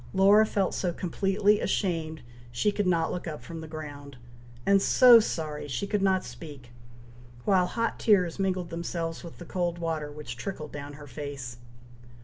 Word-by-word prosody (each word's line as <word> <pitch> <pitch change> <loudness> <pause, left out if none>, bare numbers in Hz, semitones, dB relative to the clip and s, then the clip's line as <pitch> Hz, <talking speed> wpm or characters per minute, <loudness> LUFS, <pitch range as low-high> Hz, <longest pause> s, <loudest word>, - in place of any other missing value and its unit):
Laura 205 +3 +6
felt 195 -3 0
so 180 - -1
completely 195 +4 +1
ashamed 160 - -1 0.3
she 120 - +1
could 205 -2 -1
not 165 -2 +2
look 180 - -4
up 155 -2 -6
from 165 -1 -7
the 160 - -8
ground, 145 -3 -8 0.5
and 195 0 +5
so 245 +2 +8
sorry 155 -8 -3
she 140 +8 -2
could 205 0 -1
not 190 -1 +2
speak, 125 0 -10 0.7
while 185 -3 +3
hot 230 +3 -2
tears 185 -5 +3
mingled 185 -3 -1
themselves 165 -1 -4
with 170 - -10
the 175 - -9
cold 175 -1 -2
water 160 -3 -3
which 145 -5 -7
trickled 155 +1 -6
down 145 0 -7
her 145 0 -11
face. 135 -3 -7
170 Hz, 165 wpm, -28 LUFS, 150-195 Hz, 0.7 s, so